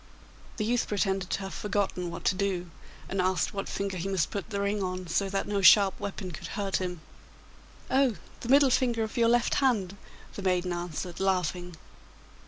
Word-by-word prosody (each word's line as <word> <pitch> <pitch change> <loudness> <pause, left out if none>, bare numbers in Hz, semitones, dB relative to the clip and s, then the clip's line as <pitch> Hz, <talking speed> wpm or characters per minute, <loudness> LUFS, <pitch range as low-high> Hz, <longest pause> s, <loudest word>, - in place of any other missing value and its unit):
The 215 - -1
youth 240 +2 +1
pretended 195 -2 0
to - - -1
have 195 0 -6
forgotten 195 -3 -1
what 170 - -8
to - - +4
do, 185 -3 -2 0.4
and 195 -1 -1
asked 185 -3 +1
what 195 -1 -4
finger 195 -1 -3
he 185 +3 -3
must 185 -5 0
put 200 +1 -4
the 200 -2 -2
ring 200 +1 0
on 185 -1 -3
so 195 +4 0
that 195 0 -2
no 205 -1 0
sharp 195 0 +7
weapon 195 -2 -5
could 155 - -7
hurt 200 -2 0
him?' 180 -3 -4 0.9
'Oh, 265 -4 +3 0.2
the 235 - -7
middle 275 0 +6
finger 240 -3 +2
of 220 - -5
your 230 -1 +4
left 240 0 +3
hand,' 205 -8 +1 0.4
the - - -6
maiden 180 -1 +1
answered, 175 0 -5
laughing. 180 -2 -1
195 Hz, 190 wpm, -28 LUFS, 180-210 Hz, 0.9 s, sharp